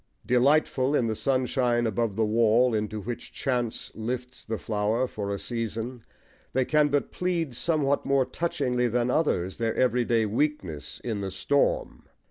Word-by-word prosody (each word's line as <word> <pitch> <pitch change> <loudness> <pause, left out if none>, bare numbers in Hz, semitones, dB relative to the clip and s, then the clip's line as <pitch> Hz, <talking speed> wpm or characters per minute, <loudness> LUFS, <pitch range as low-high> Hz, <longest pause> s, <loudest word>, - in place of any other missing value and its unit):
Delightful 135 +1 +3
in 125 - +2
the 110 - 0
sunshine 125 -1 +1
above 110 -1 0
the 110 0 +2
wall 115 +3 +3
into 105 0 -2
which 120 +4 -6
chance 125 -4 -2
lifts 125 +3 -5
the 110 0 -3
flower 110 +4 0
for 105 -5 -5
a 100 - -1
season, 115 +1 -4 0.5
they 130 0 +2
can 150 +1 +3
but 145 0 0
plead 170 -6 -1
somewhat 145 0 +1
more 135 -1 +2
touchingly 125 -7 -1
than 120 +1 +1
others 95 - 0
their 115 -1 -1
everyday 120 -3 +2
weakness 105 - -2
in 110 -4 -2
the 95 - -3
storm. 140 +10 0
120 Hz, 150 wpm, -27 LUFS, 110-135 Hz, 0.5 s, Delightful